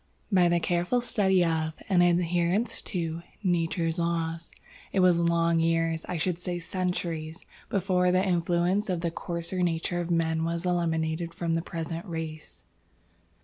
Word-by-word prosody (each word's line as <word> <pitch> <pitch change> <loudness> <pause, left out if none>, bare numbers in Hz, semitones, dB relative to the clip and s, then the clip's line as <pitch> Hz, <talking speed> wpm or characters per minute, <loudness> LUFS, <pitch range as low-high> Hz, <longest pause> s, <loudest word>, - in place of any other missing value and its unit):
"By 180 -3 +5
the 170 0 +3
careful 175 +8 +1
study 190 -6 +2
of, 160 -1 0
and 185 -3 +4
adherence 175 +4 +2
to, 165 -3 -3 0.2
Nature's 170 -2 0
laws. 170 0 -2 0.4
It 195 - +1
was 180 -2 +5
long 170 0 +2
years 165 0 +1
I 180 - -1
should 175 +1 -1
say 175 0 -3
centuries 170 -3 -3 0.2
before 180 -2 +2
the 185 +2 +2
influence 175 +3 +1
of 180 -2 -1
the 170 -1 -1
coarser 170 +2 -3
nature 175 0 0
of 175 0 -3
men 160 -1 +1
was 170 +1 -2
eliminated 165 -1 -1
from 170 -1 -1
the 165 - +1
present 165 0 -5
race. 160 -2 -6
170 Hz, 145 wpm, -28 LUFS, 165-180 Hz, 0.4 s, By